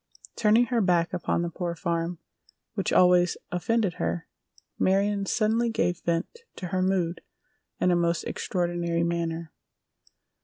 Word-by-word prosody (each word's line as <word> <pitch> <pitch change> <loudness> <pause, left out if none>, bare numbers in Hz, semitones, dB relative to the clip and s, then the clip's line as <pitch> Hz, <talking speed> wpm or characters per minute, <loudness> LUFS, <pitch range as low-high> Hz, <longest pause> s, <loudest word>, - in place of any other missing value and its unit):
Turning 220 +2 +4
her 240 -1 +1
back 175 -3 +2
upon 170 - 0
the 170 - -2
Poor 170 0 -3
Farm, 170 0 -2 0.6
which 195 -4 -1
always 180 -1 +5
offended 200 +2 +1
her, 85 0 -2 0.5
Marion 200 +1 +2
suddenly 230 +3 +1
gave 175 -6 0
vent 170 - -2 0.2
to 180 - -6
her 185 +1 0
mood 185 -2 0 0.6
in 180 - +3
a - - +4
most 170 0 +1
extraordinary 175 -2 -1
manner. 170 -1 -2
175 Hz, 130 wpm, -27 LUFS, 170-195 Hz, 0.6 s, always